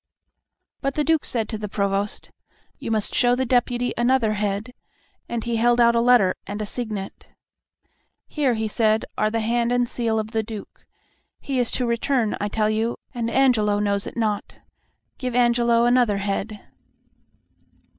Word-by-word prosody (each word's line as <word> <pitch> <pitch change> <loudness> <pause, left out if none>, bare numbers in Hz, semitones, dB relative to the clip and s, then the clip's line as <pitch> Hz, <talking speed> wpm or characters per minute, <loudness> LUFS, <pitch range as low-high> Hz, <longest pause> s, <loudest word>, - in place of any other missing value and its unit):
But 275 -1 -2
the 300 - +1
Duke 320 0 +2
said 225 -3 -2
to 220 - -4
the 210 -1 -5
Provost, 200 0 -2 0.5
"You - - -5
must 220 -2 0
show 245 0 +3
the 260 +1 -1
Deputy 245 0 +1
another 240 -2 +2
head," 210 +3 -2 0.6
and 235 -2 -3
he 235 -1 -1
held 240 +1 +3
out 235 0 +5
a 235 - +2
letter 240 -6 +5
and 205 +1 -5
a 215 - -2
signet. 210 -3 -5 1.0
"Here," 275 -6 0
he 220 0 -1
said, 215 0 +1
"are 215 - +1
the 225 +1 -1
hand 235 +2 0
and 245 0 +2
seal 230 -2 -1
of 215 0 -3
the 225 -1 0
Duke. 215 -1 -10 0.5
He 270 -2 -2
is 245 - +1
to 250 - 0
return, 235 -1 0
I 205 - 0
tell 215 0 0
you, 225 +2 -1 0.2
and 230 -2 -2
Angelo 230 -5 +3
knows 200 -1 0
it - - -8
not. 215 -3 -2 0.6
Give 250 -2 -3
Angelo 235 -1 +3
another 240 -4 +3
head." 200 +1 -3
230 Hz, 165 wpm, -23 LUFS, 215-245 Hz, 1.0 s, out